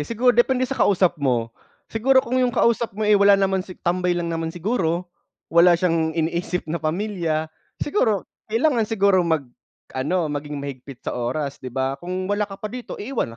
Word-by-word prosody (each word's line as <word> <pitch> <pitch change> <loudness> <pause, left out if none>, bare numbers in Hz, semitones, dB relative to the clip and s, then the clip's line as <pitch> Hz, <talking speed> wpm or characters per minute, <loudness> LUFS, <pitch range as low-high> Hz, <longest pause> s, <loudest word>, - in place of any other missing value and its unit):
Siguro 245 +2 +3
depende 250 +2 +3
sa 270 +1 -4
kausap 185 -3 +3
mo. 120 -4 0 0.4
Siguro 260 +4 +3
kung 255 +2 0
'yung 250 - +3
kausap 230 -3 +1
mo, 215 - -1
eh, 210 - +4
wala 200 0 +6
naman 195 -1 +1
si 185 0 -9
tambay 180 0 0
lang 170 -1 -2
naman 165 0 -2
siguro, 175 -1 -1 0.5
wala 170 +1 +6
siyang 165 -2 0
iniisip 170 +2 -1
na 170 - -2
pamilya. 160 -2 -2 0.2
Siguro 230 - 0 0.2
kailangan 230 0 +2
siguro 200 -4 +3
mag-ano 155 +1 -3
maging 145 0 -4
mahigpit 140 -2 -8
sa - - -2
oras 135 +4 -3
'di 130 - -6
ba, 130 +2 -2
"kung 185 +1 -4
wala 205 +1 -1
ka 195 - -8
pa 215 - -5
dito, 250 -1 -6
iiwan 210 - -3
180 Hz, 175 wpm, -23 LUFS, 155-215 Hz, 0.5 s, wala